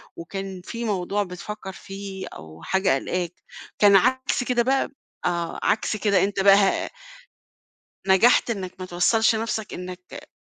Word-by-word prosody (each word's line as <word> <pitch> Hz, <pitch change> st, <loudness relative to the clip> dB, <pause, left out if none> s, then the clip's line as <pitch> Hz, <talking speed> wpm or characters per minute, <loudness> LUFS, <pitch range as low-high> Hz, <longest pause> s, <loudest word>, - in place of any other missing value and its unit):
وكان 190 Hz, +2 st, -6 dB
في 235 Hz, 0 st, -5 dB
موضوع 200 Hz, -1 st, 0 dB
بتفكّر 190 Hz, +2 st, -7 dB
فيه 195 Hz, -1 st, -8 dB
أو 80 Hz, 0 st, -12 dB
حاجة 190 Hz, -5 st, +2 dB
قلقاك، 175 Hz, +5 st, -2 dB, 0.5 s
كان 205 Hz, -1 st, +7 dB
عكس 255 Hz, +5 st, +2 dB
كده 245 Hz, -1 st, +1 dB
بقى؟ 270 Hz, +2 st, +1 dB, 0.4 s
آه، 170 Hz, -1 st, -1 dB
عكس 215 Hz, -, +1 dB
كده، 200 Hz, -1 st, +2 dB
أنت 200 Hz, 0 st, -1 dB
بقى 195 Hz, 0 st, +7 dB
ه 200 Hz, -1 st, +2 dB, 1.2 s
نجحت 210 Hz, +6 st, +5 dB
إنّك 190 Hz, -4 st, -5 dB
ما 185 Hz, -, -4 dB
توصّلش 220 Hz, +6 st, +3 dB
نَفسك 220 Hz, -1 st, -3 dB
إنّك 180 Hz, 0 st, -9 dB
195 Hz, 140 wpm, -24 LUFS, 180-220 Hz, 1.2 s, كان